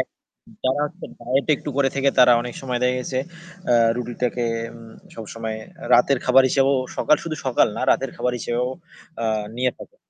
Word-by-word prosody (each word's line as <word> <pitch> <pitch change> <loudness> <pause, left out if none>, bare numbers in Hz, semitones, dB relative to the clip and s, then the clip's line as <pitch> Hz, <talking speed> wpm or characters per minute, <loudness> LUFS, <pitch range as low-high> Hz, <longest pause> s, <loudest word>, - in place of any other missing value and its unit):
এক - - -1 0.6
যারা 130 +3 +1
হচ্ছে 175 +4 -11
ডায়েট 125 +3 0
একটু 145 - -6
করে 135 -1 +3
থেকে 140 0 +3
তারা 125 -1 +8
অনেক 120 0 -6
সময় 125 -2 -2
দেখা 125 0 +2
গেছে 130 +1 -3 0.5
আ - - +5 0.2
রুটিটাকে 120 0 -2 0.3
উম 115 -1 -12 0.2
সবসময় 110 0 -6 0.4
রাতের 125 +2 +5
খাবার 130 +1 +6
হিসেবেও 135 +1 +3 0.2
সকাল 150 - +4
শুধু 155 -2 -4
সকাল 125 - +4
না - - -3
রাতের 135 -1 +1
খাবার 125 - -1
হিসেবেও 120 +2 -1 0.5
আ - - 0 0.3
নিয়ে 125 0 +1
থাকে। - - -13
125 Hz, 170 wpm, -22 LUFS, 120-135 Hz, 0.6 s, তারা